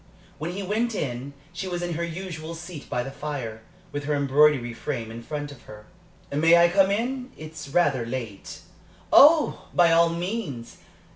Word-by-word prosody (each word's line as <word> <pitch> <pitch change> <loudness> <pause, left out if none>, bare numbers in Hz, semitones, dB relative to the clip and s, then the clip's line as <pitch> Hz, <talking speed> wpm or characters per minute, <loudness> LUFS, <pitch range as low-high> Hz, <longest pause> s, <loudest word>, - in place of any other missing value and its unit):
When 165 +4 -3
he 200 +2 -4
went 220 +4 -1
in, 135 -3 -4 0.2
she 175 +2 -5
was 175 -1 -3
in 175 -1 -2
her 170 +2 -2
usual 170 -1 -6
seat 170 -3 -9
by 125 - -1
the 135 - -7
fire, 135 -6 -5 0.3
with 145 0 -4
her 150 0 0
embroidery 140 -3 +3
frame 115 -2 -4
in 115 +1 -8
front 145 +3 -5
of 140 - -13
her. 105 0 -12 0.5
"May 165 +4 +5
I 170 0 +6
come 195 +1 +4
in? 250 +5 -2
It 155 0 -9
is 160 -3 -9
rather 140 -6 +2
late." 115 -4 -6 0.5
"Oh, 305 +1 +6
by 175 -1 +5
all 170 0 +5
means! 170 - -4
155 Hz, 180 wpm, -25 LUFS, 135-175 Hz, 0.5 s, I